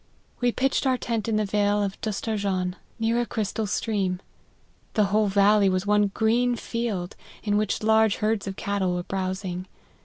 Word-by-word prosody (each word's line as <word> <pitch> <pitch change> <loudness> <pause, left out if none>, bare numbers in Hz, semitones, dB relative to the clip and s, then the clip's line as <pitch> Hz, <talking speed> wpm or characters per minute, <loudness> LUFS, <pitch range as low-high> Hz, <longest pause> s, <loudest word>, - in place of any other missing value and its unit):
We 245 -1 +2
pitched 270 +2 +1
our 260 -1 +3
tent 230 -3 -2
in 220 - +1
the 215 0 +1
vale 205 0 +1
of 195 -1 -4
Dustarjan, 200 -4 -1 0.2
near 230 +1 +1
a - - -1
crystal 215 0 -2
stream; 195 -3 -1 0.8
the 215 - +4
whole 215 0 +4
valley 200 0 +4
was 185 +1 0
one 210 0 +3
green 235 +4 +2
field, 225 -6 -3 0.3
in 205 -1 +1
which 210 0 0
large 220 -1 +4
herds 215 -1 -1
of 195 - -4
cattle 190 -3 -1
were 175 - -2
browsing. 185 -1 -3
210 Hz, 165 wpm, -25 LUFS, 195-220 Hz, 0.8 s, the